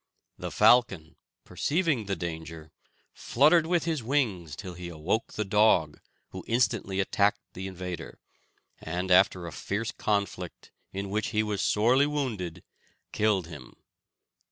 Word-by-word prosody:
The - - -4
falcon, 95 -10 +3 0.3
perceiving 150 - 0
the 100 - -1
danger, 80 -2 -7 0.4
fluttered 155 +5 +3
with 175 -1 +1
his 160 -4 -1
wings 110 - -1
till 95 -1 -8
he 90 0 -7
awoke 85 +7 -2
the 105 - -2
dog, 95 -7 +3 0.3
who - - -8
instantly 115 -5 0
attacked 100 +1 +2
the 95 +1 -6
invader, 90 -2 -7 0.6
and 90 +3 -3
after 90 -1 +4
a 85 - -6
fierce 105 +8 -3
conflict, 100 -4 -3 0.2
in 100 0 -5
which 105 +1 -1
he 110 -1 0
was 105 -2 -2
sorely 125 +7 +3
wounded, 115 - -3 0.5
killed 105 -4 +1
him. 80 -3 -11
100 Hz, 130 wpm, -28 LUFS, 90-115 Hz, 0.6 s, after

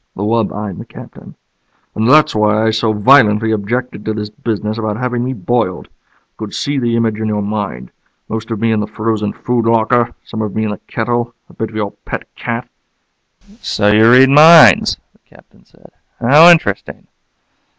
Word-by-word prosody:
The 100 - -5
wub 115 +1 0
eyed 105 -3 -6
the - - -9
Captain. - - -14 0.6
"And 110 +2 -1
that's 155 +2 +4
why 105 0 +1
I 110 - +2
so 110 0 0
violently 110 -1 +3
objected 110 +2 -3
to 110 - -3
this 105 -1 -6
business 110 0 -4
about 110 -1 -3
having 125 0 -3
me 130 +1 -3
boiled. 110 -4 -3
I - - -42
could 110 -2 -7
see 140 -1 -2
the 120 -2 -1
image 110 -2 -1
in 110 - -3
your 105 -1 -2
mind 100 - -5 0.4
most 110 +1 -6
of 115 -3 -4
me 115 +1 0
in 110 - 0
the 105 - -3
frozen 110 -1 -3
food 120 -2 -2
locker, 115 +1 +1
some 110 - -7
of 105 -2 -5
me 110 - -1
in 105 - -3
the 105 - -7
kettle, 120 +1 -3
a - - -18
bit 110 - -5
for 110 - -14
your 105 -2 -3
pet - - -8
cat - - -5 0.5
" 200 +1 -29
"So 105 -1 0
you 110 +2 +5
read 130 +2 +6
minds?" 150 - +6 0.2
the - - -32
Captain - - -24
said. - - -22 0.3
"How 150 +8 +6
interesting. 160 - 0
110 Hz, 190 wpm, -15 LUFS, 105-120 Hz, 0.6 s, read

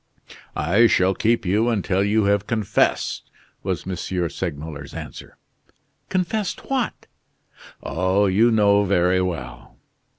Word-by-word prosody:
"I 100 +9 +4
shall 95 -3 +3
keep 115 +1 +1
you 105 +6 +2
until 100 -3 0
you 105 +2 +2
have 100 0 +1
confessed," 110 -3 0 0.3
was - - -3
M. 95 - -2 0.3
Segmuller's 75 -4 -6
answer. - - -9 0.7
"Confessed 190 +6 -2
what?" 260 -4 -2 0.8
"Oh! 95 +4 +1
you 105 +5 +4
know 105 -2 +4
very 90 -1 +2
well." 80 -10 -5
100 Hz, 110 wpm, -22 LUFS, 90-110 Hz, 0.8 s, I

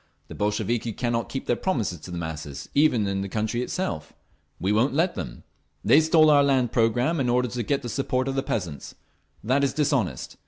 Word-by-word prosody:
The - - -7
Bolsheviki 110 +2 -1
cannot 120 0 -1
keep 135 - -4
their 120 - +1
promises 115 - -1
to 85 - -11
the 90 - -5
masses, 80 -3 -6
even 140 -7 +3
in 100 0 -1
the 100 - -4
country 110 +3 -1
itself. 110 - -3 0.5
We 95 - 0
won't 120 +6 +2
let 170 +4 +2
them…. - - -7 0.4
They 135 +9 +6
stole 155 -1 +5
our 145 -1 +6
land 130 -4 +2
programme 120 +8 +2
in 125 -3 +1
order 125 0 +2
to 120 +1 -3
get 140 +5 -1
the - - -4
support 130 +1 -1
of 135 - -1
the 135 - 0
peasants. 90 - -4 0.5
That 130 +6 +2
is 140 - +1
dishonest. 140 - -1
120 Hz, 200 wpm, -25 LUFS, 105-140 Hz, 0.5 s, They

